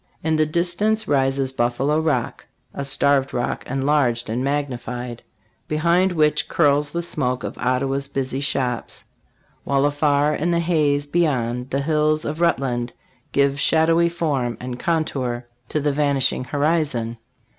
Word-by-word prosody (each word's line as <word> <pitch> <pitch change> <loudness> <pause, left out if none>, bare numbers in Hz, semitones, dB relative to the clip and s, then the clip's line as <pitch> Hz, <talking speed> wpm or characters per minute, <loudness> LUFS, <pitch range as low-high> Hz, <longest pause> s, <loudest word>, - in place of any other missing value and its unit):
In 160 0 +1
the 155 0 +2
distance 185 +7 0
rises 135 -1 +1
Buffalo 130 +4 0
Rock, 150 -7 -1 0.3
a 140 - -4
Starved 140 0 +2
Rock 120 - -2
enlarged 135 -4 +1
and 120 +3 -1
magnified, 125 -4 -3 0.5
behind 170 +5 +2
which 150 -3 +2
curls 145 -2 +2
the 170 +3 -3
smoke 125 -7 -2
of - - -5
Ottawa's 135 +2 0
busy 135 -1 -3
shops; 130 -4 -2 0.6
while 140 0 +1
afar 145 0 +2
in 155 +3 -1
the 170 -1 +2
haze 150 -4 +1
beyond 130 -6 0
the 140 +1 -1
hills 155 +1 +1
of 155 +3 -4
Rutland 130 -7 0 0.4
give 140 0 +2
shadowy 165 +2 +3
form 140 -8 -1
and 125 0 -6
contour 130 -7 -1 0.2
to 155 - 0
the 145 0 +1
vanishing 140 -3 +1
horizon. 140 -5 -1
140 Hz, 135 wpm, -22 LUFS, 130-155 Hz, 0.6 s, shadowy